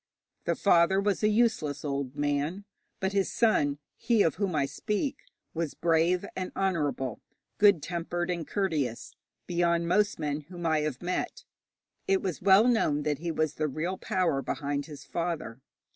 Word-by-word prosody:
The - - +1
father 190 0 +4
was 200 0 0
a 215 - +4
useless 210 - +1
old 140 -2 -3
man, 145 +7 -1 0.3
but 190 0 -1
his 195 -1 +1
son, 145 -11 +2 0.2
he 230 -3 +2
of 165 - +2
whom 195 -4 -1
I 140 -2 +2
speak, 210 - -2 0.4
was 165 -3 -3
brave 170 +3 +2
and 185 -1 -4
honourable, 145 - -1 0.4
good 200 -7 +5
tempered 175 +1 -2
and 170 -3 -3
courteous, 155 - -2 0.3
beyond 170 -1 +1
most 205 +3 +2
men 145 -1 -2
whom 175 -2 -7
I 160 -1 +3
have 150 -2 -3
met. 180 +1 -3 0.6
It 195 0 +2
was 185 -4 -3
well 195 +4 +6
known 150 -12 +2
that 150 -2 -1
he 170 +1 -3
was 155 -1 0
the 155 0 -1
real 165 +6 -3
power 185 -9 0
behind 140 0 -3
his 150 -3 -10
father. 165 -8 -3
170 Hz, 160 wpm, -29 LUFS, 150-195 Hz, 0.6 s, well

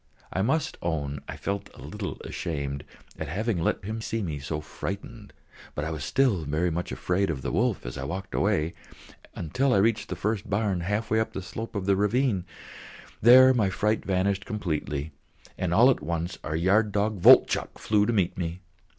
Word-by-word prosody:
I 95 - 0
must 150 +8 0
own 75 -4 -2
I - - -6
felt 100 0 -3
a - - -13
little - - -5
ashamed 70 -4 -4 0.4
at - - -3
having 100 +3 -1
let 90 - 0
him 110 +2 -4
see 115 -1 -2
me 80 -5 -3
so 75 +2 -3
frightened, 100 +7 -7 0.4
but 75 - -2
I 80 - -3
was 75 -3 -4
still 115 - +2
very 80 +4 0
much 85 +2 -3
afraid 95 +1 0
of 70 -5 -3
the 60 - -2
wolf 115 - 0
as - - -5
I 65 - -4
walked 95 +5 -5
away, 85 -5 +1 0.6
until 125 - +1
I - - +4
reached 110 +3 +2
the - - -3
first 105 -2 -2
barn 100 -2 0
half 105 +6 -2
way 110 - +4
up 110 - -1
the 95 - -5
slope 110 +4 -7
of 100 -2 -2
the 100 0 +3
ravine; 105 -1 +1 0.8
there 130 +3 +8
my 110 -6 +2
fright 105 +3 0
vanished 95 +1 0
completely, 80 - -3 0.4
and - - -2
all - - +6
at - - -2
once 85 +3 -3
our 75 - -3
yard 100 +6 +3
dog 105 0 0
Voltchok - - +5
flew 105 -1 +2
to - - +2
meet 95 -5 +1
me. 85 0 -4
95 Hz, 195 wpm, -27 LUFS, 80-110 Hz, 0.8 s, there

